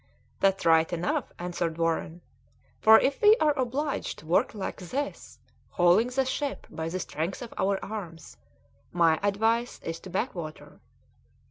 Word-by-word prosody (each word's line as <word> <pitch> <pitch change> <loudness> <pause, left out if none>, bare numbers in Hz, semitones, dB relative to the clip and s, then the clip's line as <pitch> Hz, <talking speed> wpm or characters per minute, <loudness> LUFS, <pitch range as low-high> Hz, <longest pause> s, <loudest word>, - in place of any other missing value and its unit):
"That's 195 0 +2
right 160 -1 +4
enough," 175 0 -2
answered 175 -2 -3
Warren, 165 0 -1 0.6
"for 220 0 +8
if 270 +1 0
we 425 +1 +7
are 300 -2 +3
obliged 270 +2 -2
to - - -14
work 170 +6 +1
like 195 - -4
this, 265 +11 -5 0.3
hauling 175 +6 +4
the 260 +1 0
ship 280 +2 -3
by 160 +1 -4
the 185 +2 -3
strength 170 +6 -4
of 235 - -9
our 195 0 +1
arms, 180 -6 -8 0.6
my 165 -2 +3
advice 225 +4 0
is 165 0 -4
to 190 - -11
backwater." 175 - -5
190 Hz, 145 wpm, -27 LUFS, 165-240 Hz, 0.6 s, for